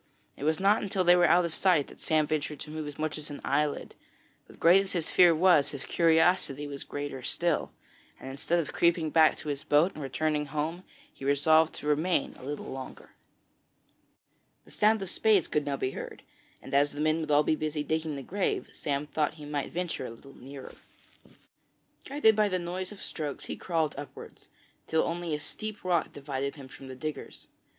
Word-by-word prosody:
It 145 - -6
was 155 0 +2
not 200 +3 +4
until 195 -2 0
they 175 0 +7
were 175 -1 +5
out 175 +1 +5
of 165 - -4
sight 175 -7 +3
that - - -14
Sam 155 -1 +2
ventured 150 -1 -2
to 150 - -7
move 155 -1 -5
as 145 - -8
much 155 0 -2
as 150 - -8
an 145 - -7
eyelid; 145 +1 0 0.5
but - - -17
great 180 +4 +6
as 195 - -5
his 170 -4 -2
fear 175 -2 +6
was, 170 -4 +4
his 140 -2 -7
curiosity 165 -3 +3
was 140 -1 -6
greater 145 -2 -5
still, 170 +5 -1 0.5
and - - -9
instead 140 +5 -1
of 165 -4 -2
creeping 170 -2 +2
back 160 -1 +5
to 150 - -6
his 145 0 -3
boat 155 +6 +3
and 155 - -8
returning 150 +2 -1
home, 155 +5 -3 0.3
he - - -13
resolved 155 +3 +3
to - - -7
remain 150 +2 +1
a - - -13
little 145 +2 -5
longer. 130 0 -8 1.5
The - - -17
sound 215 -1 +3
of 190 - -5
spades 210 -6 +3
could 150 -1 0
now 140 -1 -1
be 130 - -1
heard, - - -8 0.4
and 135 - -10
as 145 +1 +3
the 145 - -8
men 155 +1 +2
would 155 -2 -4
all 150 0 +5
be 155 - +2
busy 155 -1 -2
digging 160 -1 -2
the 140 - -6
grave, 195 +7 -2
Sam 140 0 -2
thought 150 0 -1
he 150 -2 -10
might 145 -1 -3
venture 170 -6 -3
a - - -8
little 135 +4 -14
nearer. 135 +1 -10 1.3
Guided 265 -6 +3
by 210 -1 +3
the 185 - 0
noise 180 +2 -4
of 210 - -10
the - - -10
strokes 150 -3 -5
he - - -5
crawled 160 -4 -1
upwards, 145 -2 -10 0.4
till 160 - +2
only 170 -2 -2
a - - -5
steep 215 +7 -6
rock 175 -3 +1
divided 140 0 -4
him 140 -3 -10
from 135 - -11
the 130 - -8
diggers. 155 +3 -6
155 Hz, 205 wpm, -29 LUFS, 145-175 Hz, 1.5 s, they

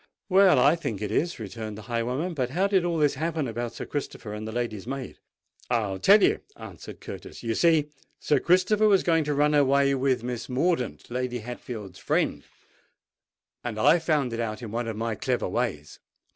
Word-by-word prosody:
"Well, 190 -3 +6
I 140 +5 +5
think 115 - -4
it 105 - -3
is," 170 +2 0
returned 110 0 -6
the 110 - -9
highwayman. 125 - -2
"But 130 -5 -1
how 180 +9 +1
did 195 -3 +2
all 170 -1 0
this 150 -2 +3
happen 155 0 -2
about 120 +1 -4
Sir - - -5
Christopher 130 -6 -5
and 105 +1 -6
the - - -5
lady's 115 -3 -3
maid?" 135 -1 -6 0.5
"I'll 105 -6 0
tell 200 - +6
you," - - +3 0.2
answered - - -10
Curtis. - - -9
"You 115 -1 -1
see, 155 +2 +3 0.3
Sir 145 - +2
Christopher 185 +6 +3
was 195 -3 +4
going 165 -2 +2
to 150 0 -1
run 150 +1 +3
away 140 -1 +4
with 130 -3 +1
Miss 125 0 -5
Mordaunt, 130 -2 -1
Lady 125 0 -2
Hatfield's 110 -4 -8
friend, - - 0 1.2
and 115 -3 -4
I 165 +10 +5
found 150 -7 0
it 115 - -3
out 115 +1 -3
in 110 - -6
one 115 +1 -2
of 110 -2 -4
my 115 0 -1
clever 105 - -1
ways. 75 0 -3
130 Hz, 190 wpm, -26 LUFS, 115-160 Hz, 1.2 s, Well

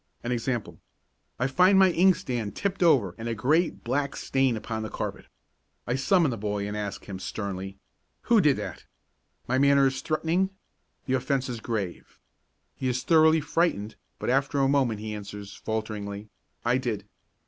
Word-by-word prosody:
An 120 - -2
example: 120 -1 -2 0.6
I 125 - 0
find 180 +8 +5
my 190 -1 +6
inkstand 130 - +1
tipped 200 -1 -2
over 130 - +4
and 115 +1 -4
a 115 - -1
great 155 - +1
black 140 +3 -1
stain 135 -3 +1
upon 110 0 -4
the 110 - -4
carpet. - - -5 0.6
I 120 - -1
summon 155 +3 +3
the 115 - -3
boy 105 -1 -2
and 105 - -4
ask 105 -2 -4
him 95 -2 -6
sternly: 95 0 -5 0.5
"Who 230 -3 +4
did 150 -5 +4
that?" - - -6 0.6
My 130 +2 +1
manner 140 0 +5
is 130 -1 0
threatening. 165 +5 0 0.6
The 130 - -1
offence 130 0 0
is 120 -2 -4
grave. 105 -6 -4 0.6
He 130 - -3
is 125 0 -1
thoroughly 160 +1 +5
frightened, 145 - 0 0.2
but - - -1
after 135 +2 +1
a 135 -1 +3
moment 130 -6 +1
he 110 0 -4
answers, 105 -1 -8
falteringly, 105 -2 -4 0.4
"I 120 +2 +3
did." 120 -5 -3
125 Hz, 165 wpm, -27 LUFS, 105-145 Hz, 0.6 s, my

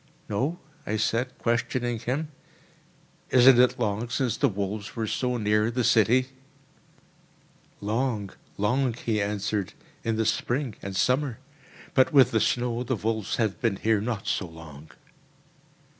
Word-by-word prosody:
"No?" 135 +12 -1 0.3
I 110 - -2
said, 120 +4 -1
questioning 120 0 -1
him; 135 +7 -2 1.0
"isn't 125 0 +7
it 125 0 +4
long 110 0 -1
since 125 0 0
the - - +2
wolves 100 0 -4
were 115 -2 -1
so 125 +3 -1
near 105 0 +2
the 120 +1 -1
city?" 120 +4 +3 1.5
"Long, 105 -1 -1 0.3
long," 120 +4 +1
he 110 -3 -1
answered, 100 -1 -2 0.3
"in 115 -1 0
the 110 0 0
spring 120 +3 -1
and 100 -1 -6
summer; 125 +4 +1 0.6
but 130 +3 +4
with 135 -5 +6
the 110 - +2
snow 120 -1 0
the 125 +1 -1
wolves 110 0 -2
have 110 -4 -1
been 115 -5 +1
here 110 +1 +1
not 110 -2 -3
so 95 - -1
long." 80 -2 -12
115 Hz, 140 wpm, -26 LUFS, 105-125 Hz, 1.5 s, isn't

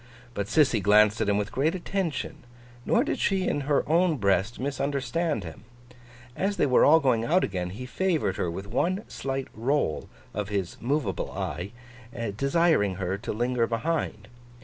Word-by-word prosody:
But, 100 -3 -3
Sissy 135 -3 +3
glanced 105 +2 +4
at - - +1
him 100 - +2
with 105 0 -2
great 155 +7 +1
attention; 180 -5 -3 0.5
nor 235 - +4
did - - -2
she 190 -2 +1
in 145 - 0
her 145 - +2
own 165 +1 +3
breast 100 +1 +1
misunderstand 140 - -1
him. 80 +3 -10 0.7
As 200 +1 -1
they - - +3
were 130 -3 +4
all 160 +3 +7
going 125 -6 +2
out 175 +9 +2
again, 90 -2 -2
he 110 +8 -7
favoured 160 - 0
her 90 - -1
with 95 +4 -5
one 175 - -1
slight 135 0 -4
roll 120 - -1 0.2
of 105 0 -3
his 100 -4 -3
movable 125 -5 -1
eye, 90 -1 -4 0.7
desiring 140 - +2
her 95 0 -2
to 115 - -4
linger 120 +1 0
behind. 115 -3 -2
125 Hz, 165 wpm, -27 LUFS, 100-155 Hz, 0.7 s, all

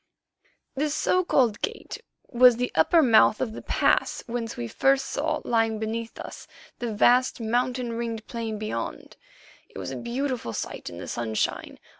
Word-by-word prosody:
This 295 +2 -1
so 365 0 +2
called 245 - +2
gate - - -4 0.3
was 250 0 +6
the 250 +2 -2
upper 315 - +4
mouth 220 -3 +5
of 220 - -2
the - - -7
pass - - +1
whence 230 -1 -4
first 120 -1 -7
we 270 +1 +5
saw, 300 +3 -2
lying 225 -2 +1
beneath 225 +1 -4
us, - - -9 0.3
the 240 -2 -3
vast, 245 +5 +3
mountain 245 +1 -1
ringed 230 -1 -4
plain 225 -2 -4
beyond. 215 0 -5 0.5
It - - -13
was - - -5
a - - -5
beautiful 245 - -3
sight - - -5
in 85 - -10
the 90 - -7
sunshine. 110 -2 -2
235 Hz, 160 wpm, -26 LUFS, 220-255 Hz, 0.5 s, was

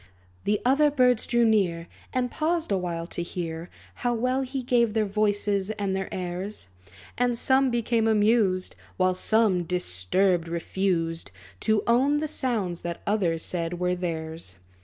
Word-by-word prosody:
The 210 0 +2
other 285 +4 +4
birds 250 -5 +2
drew 240 -1 +3
near, 180 -7 +1 0.2
And 250 -1 -1
paused 320 -3 -1
awhile 175 -3 -1
to 175 - -5
hear 170 -1 -5 0.2
How 245 -1 -1
well 255 +3 0
he 265 0 -4
gave 235 -3 +2
their 220 -1 +2
voices 205 -1 0
and 200 -3 -2
their 190 -1 -3
airs. 185 - -5 0.5
And 245 -1 +2
some 265 +2 +3
became 235 -1 +1
amused; 210 -3 +2 0.2
While 185 0 +3
some, 210 -1 +2
disturbed, 175 - 0
refused 170 -1 -1 0.3
To 215 -1 +1
own 265 +5 +3
the 310 +1 -1
sounds 215 - -2
that 170 -1 -5
others 180 -6 0
said 170 -1 -2
were 180 0 +1
theirs. 160 - -5
200 Hz, 145 wpm, -26 LUFS, 175-240 Hz, 0.5 s, other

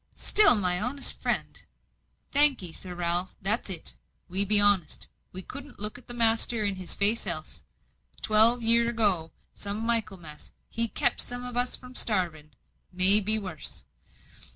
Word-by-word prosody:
"Still, 415 -9 +4
my 180 -3 -2
honest 265 +5 -1
friend - - -5 0.3
" - - -48
"Thank 285 -6 +2
'ee, 170 -3 -5
Sir 180 +1 -10
Ralph, 175 +1 -3
that's 210 +3 -2
it: 170 - -2 0.3
we 190 +3 +5
be 205 +1 +6
honest; 200 -6 0 0.3
we 185 +1 -3
couldn't 280 +6 -12
look 210 +4 -5
the 240 - -9
master 230 -1 0
in 195 -2 -4
the 185 - -10
face 210 +1 +1
else. 155 -3 -5 0.6
Twelve 225 +3 +5
year 235 +1 +2
ago, 200 -8 -1 0.3
come 200 0 -4
Michaelmas, 195 -9 -6 0.2
he 230 0 -2
kept 240 +3 -1
some 245 0 -6
on 245 -1 -9
us 245 +1 -2
from 250 0 -15
starving 175 -10 -2 0.4
may 190 +3 +9
be 215 +1 0
worse. 185 -8 -9
210 Hz, 155 wpm, -25 LUFS, 185-235 Hz, 0.6 s, may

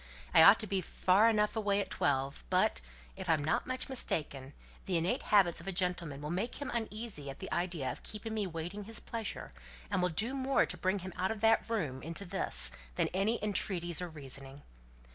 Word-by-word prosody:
"I - - +8
ought 200 +6 +9
to - - 0
be 195 -2 -1
far 190 +5 +3
enough 210 -1 +2
away 205 -2 +1
at 200 - -3
twelve; 135 - 0
but, 65 - +2 0.3
if - - -6
I'm 155 -3 +3
not 155 - 0
much 255 0 -2
mistaken, 145 - -2 0.3
the 185 -3 +1
innate 165 +3 0
habits 190 -6 +4
of 170 - -12
a - - 0
gentleman 175 -6 -1
will 150 - -3
make 195 +7 -2
him 285 - -4
uneasy 220 -9 -4
at 135 - -7
the - - -7
idea 170 -7 -1
of - - -9
keeping 220 +1 -6
me 210 -3 -1
waiting 175 +5 -5
his 225 +1 0
pleasure, 225 -2 -5 0.4
and 190 -2 +1
will 180 - +2
do 215 +10 -1
more 270 0 +2
to - - -3
bring 185 +2 0
him 185 - -6
out 185 +1 0
of 220 -2 -4
that 225 0 +4
room 155 - -2
into 165 +7 -3
this 190 +1 0 0.2
than - - +1
any 200 +5 +1
entreaties 180 -5 0
or 180 - -4
reasoning." 140 -2 -8
185 Hz, 205 wpm, -33 LUFS, 160-215 Hz, 0.4 s, ought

